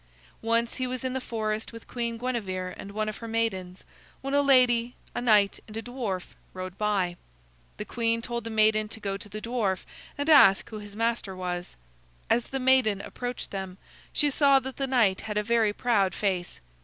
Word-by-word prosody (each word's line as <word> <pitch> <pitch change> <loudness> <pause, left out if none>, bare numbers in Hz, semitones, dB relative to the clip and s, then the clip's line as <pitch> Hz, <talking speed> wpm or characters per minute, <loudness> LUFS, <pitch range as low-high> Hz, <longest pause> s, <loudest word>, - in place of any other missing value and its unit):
Once 230 +1 +1
he 255 - -1
was 255 +1 -4
in 260 -1 -1
the 260 - -2
forest 220 -2 -3
with 230 -1 -11
Queen 235 -1 -3
Guinevere 195 -7 -3
and 200 - -8
one 215 +1 -2
of 215 - -4
her 230 - -7
maidens, 195 -5 -2 0.4
when 275 +1 -3
a 285 - +5
lady, 250 -3 +4 0.2
a - - -2
knight, 210 -5 +4
and 215 0 -8
a - - -2
dwarf 225 -7 -4 0.2
rode 185 0 -6
by. 195 -4 0 0.6
The - - -5
queen 230 -1 0
told 235 0 -4
the 230 - -5
maiden 215 -1 +3
to 220 - -6
go 200 -2 -2
to 205 +1 -8
the 210 +2 -5
dwarf 225 -6 -1 0.3
and 285 +1 -2
ask 275 -12 +7
who 215 - -5
his 205 -1 -10
master 230 -3 -1
was. 180 -1 -4 0.6
As 240 - +3
the 270 - -4
maiden 255 -6 +4
approached 245 +4 -5
them, 190 -2 -5 0.3
she 295 -1 +1
saw 275 0 +5
that 265 0 -7
the 275 - -1
knight 230 -8 +3
had 210 -1 -4
a 210 - +2
very 225 -1 +3
proud 205 -5 +1
face. 185 - -2
225 Hz, 195 wpm, -27 LUFS, 200-245 Hz, 0.6 s, ask